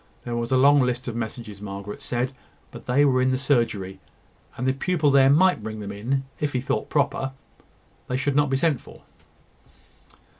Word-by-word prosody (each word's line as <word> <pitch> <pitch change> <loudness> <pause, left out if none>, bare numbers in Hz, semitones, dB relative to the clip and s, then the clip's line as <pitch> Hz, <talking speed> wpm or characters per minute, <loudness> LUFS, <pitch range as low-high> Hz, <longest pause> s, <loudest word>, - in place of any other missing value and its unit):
There 120 - -4
was 120 +1 -3
a 130 - +4
long 140 +2 +6
list 125 0 -1
of 120 - -4
messages, 110 -3 -6
Margaret 100 0 -7
said, 125 +1 -2 0.4
but - - -11
they 135 +4 +4
were 130 -2 +3
in 130 - +3
the 130 - +1
surgery; 115 -9 0 0.6
and 125 - -3
the 130 - +3
pupil 150 +1 +1
there 135 -1 +6
might 180 -1 +4
bring 110 0 -6
them 100 -1 -6
in, 125 +7 -2 0.2
if 150 -1 -1
he 130 - +1
thought 130 - -2
proper: 135 -2 0 0.7
they 125 - -1
should 140 +1 -1
not 145 -1 +3
be 135 - +1
sent 150 -1 +1
for. - - -15
130 Hz, 190 wpm, -24 LUFS, 115-140 Hz, 0.7 s, long